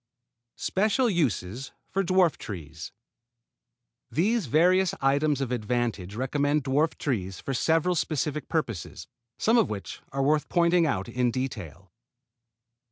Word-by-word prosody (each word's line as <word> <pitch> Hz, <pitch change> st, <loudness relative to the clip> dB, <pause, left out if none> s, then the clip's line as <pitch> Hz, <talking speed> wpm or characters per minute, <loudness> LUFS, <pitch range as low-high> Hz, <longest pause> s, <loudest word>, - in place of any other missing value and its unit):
SPECIAL 215 Hz, +5 st, +1 dB
USES 130 Hz, -, -1 dB, 0.2 s
FOR 195 Hz, -, +1 dB
DWARF 185 Hz, -2 st, +2 dB
TREES 80 Hz, -6 st, -7 dB, 1.2 s
These 210 Hz, -, +1 dB
various 180 Hz, +7 st, +3 dB
items 140 Hz, +1 st, +2 dB
of 130 Hz, -3 st, -2 dB
advantage 115 Hz, -4 st, -2 dB
recommend 145 Hz, +4 st, 0 dB
dwarf 140 Hz, +4 st, +2 dB
fruit -, -, -28 dB
trees 95 Hz, -9 st, -2 dB
for 135 Hz, -, -4 dB
several 165 Hz, +6 st, +2 dB
specific 150 Hz, -2 st, -2 dB
purposes, -, -, -3 dB, 0.3 s
some 230 Hz, +2 st, +3 dB
of 225 Hz, -, +2 dB
which 100 Hz, -2 st, -6 dB
are 135 Hz, 0 st, -1 dB
worth 150 Hz, +2 st, +2 dB
pointing 170 Hz, -1 st, +3 dB
out 95 Hz, -9 st, -1 dB
in 125 Hz, -1 st, 0 dB
detail. 100 Hz, -, -5 dB
140 Hz, 125 wpm, -27 LUFS, 120-170 Hz, 1.2 s, various